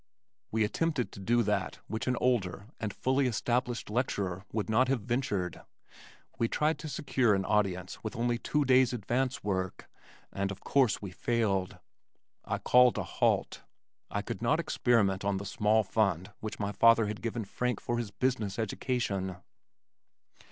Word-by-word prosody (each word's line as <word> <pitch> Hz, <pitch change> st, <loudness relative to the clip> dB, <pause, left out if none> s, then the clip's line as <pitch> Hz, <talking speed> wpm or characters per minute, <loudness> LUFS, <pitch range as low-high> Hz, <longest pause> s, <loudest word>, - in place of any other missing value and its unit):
We 110 Hz, 0 st, +1 dB
attempted 135 Hz, +4 st, -1 dB
to -, -, -10 dB
do 120 Hz, +5 st, +2 dB
that 105 Hz, -2 st, -1 dB
which 110 Hz, +3 st, -4 dB
an 125 Hz, -1 st, +1 dB
older 100 Hz, -6 st, 0 dB
and 110 Hz, -3 st, -2 dB
fully 130 Hz, +5 st, +1 dB
established 120 Hz, +1 st, -1 dB
lecturer 100 Hz, -6 st, -1 dB
would 110 Hz, -1 st, -2 dB
not 115 Hz, +4 st, +3 dB
have 130 Hz, -3 st, +1 dB
ventured. 120 Hz, -8 st, -2 dB, 0.8 s
We 115 Hz, -, +3 dB
tried 150 Hz, +6 st, 0 dB
to 155 Hz, -, -6 dB
secure 130 Hz, -7 st, +2 dB
an 95 Hz, -1 st, -1 dB
audience 95 Hz, -3 st, 0 dB
with 110 Hz, -, -4 dB
only 120 Hz, 0 st, 0 dB
two 150 Hz, +2 st, 0 dB
days' 130 Hz, -1 st, +4 dB
advance 125 Hz, +3 st, -1 dB
work, 95 Hz, -2 st, -2 dB, 0.5 s
and 100 Hz, 0 st, -1 dB
of 100 Hz, -, -7 dB
course 130 Hz, -7 st, +2 dB
we 100 Hz, -, -5 dB
failed. 100 Hz, -3 st, 0 dB, 0.7 s
I -, -, -2 dB
called 125 Hz, -1 st, +5 dB
a -, -, -1 dB
halt. -, -, 0 dB, 0.5 s
I -, -, -2 dB
could -, -, -5 dB
not -, -, +2 dB
experiment 100 Hz, -5 st, +2 dB
on 100 Hz, -1 st, 0 dB
the 100 Hz, -, -5 dB
small 105 Hz, +3 st, +2 dB
fund 95 Hz, -2 st, 0 dB
which 110 Hz, -, -6 dB
my 100 Hz, -1 st, -1 dB
father 115 Hz, +2 st, +5 dB
had 105 Hz, 0 st, -4 dB
given 115 Hz, -1 st, -3 dB
Frank 125 Hz, +5 st, -2 dB
for 120 Hz, 0 st, -2 dB
his 115 Hz, -3 st, -3 dB
business 105 Hz, -1 st, -1 dB
education. 105 Hz, -4 st, -2 dB
110 Hz, 160 wpm, -30 LUFS, 100-125 Hz, 0.8 s, called